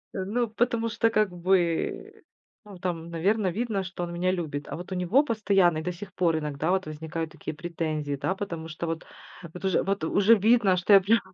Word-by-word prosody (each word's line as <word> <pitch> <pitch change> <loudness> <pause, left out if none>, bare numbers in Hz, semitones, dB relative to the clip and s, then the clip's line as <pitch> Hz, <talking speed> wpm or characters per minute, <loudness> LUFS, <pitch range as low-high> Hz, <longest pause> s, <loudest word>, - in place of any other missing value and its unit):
Э, 190 - -2
ну, 235 +4 0
потому 230 0 0
что, 225 +1 +2
как 215 -4 +1
бы, 175 -1 0 0.4
ну, 200 -3 -11
там, 170 -2 -3
наверно, 195 +5 +1
видно, 210 +1 -1
что 180 -1 -5
он 170 - -5
меня 180 +2 0
любит. 155 -6 -4
А - - -4
вот 175 +2 -9
у 185 - -2
него 185 - +3
постоянно 200 - +2
и - - -4
до 180 +2 -2
сих 190 +1 -10
пор 170 -4 +1
иногда 150 +2 -2
вот 190 0 +1
возникают 160 +1 -5
такие - - -7
претензии, 155 -3 -3
да. 190 - -1
Потому 170 -5 -5
что 165 +1 -5
вот 165 0 -4 0.5
вот 180 - -10
уж 190 - +1
вот 195 -3 -1
уже 205 +6 +5
видно, 215 -2 +4
что 180 +3 +3
я 195 - +10
прям 225 +5 +3
180 Hz, 210 wpm, -27 LUFS, 165-205 Hz, 0.5 s, я